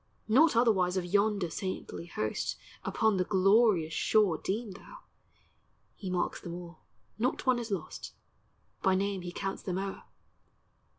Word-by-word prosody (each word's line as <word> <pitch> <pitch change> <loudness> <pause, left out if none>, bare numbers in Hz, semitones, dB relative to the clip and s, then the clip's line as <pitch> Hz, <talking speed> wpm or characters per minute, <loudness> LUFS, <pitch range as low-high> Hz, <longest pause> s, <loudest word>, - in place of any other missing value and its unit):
.Not 275 +6 +5
otherwise 195 -6 +3
of 180 - -1
yonder 200 -1 +1
Saintly 185 -2 -5
host 110 -9 -2 0.3
Upon 220 -3 +1
the 185 - +2
glorious 195 -3 +3
shore 200 -3 +3
Deem 210 +2 -3
thou. 200 - -12 1.0
He 190 - -6
marks 180 -1 -1
them 170 -1 -6
all, 170 -2 -9 0.4
not 250 +3 0
one 255 -2 +3
is 235 -1 -5
lost; 190 -6 -5 0.7
By 190 -1 +3
name 195 0 -1
He 175 0 -6
counts 195 +2 -4
them 185 -1 -3
o'er. 195 0 -4
195 Hz, 140 wpm, -30 LUFS, 180-215 Hz, 1.0 s, Not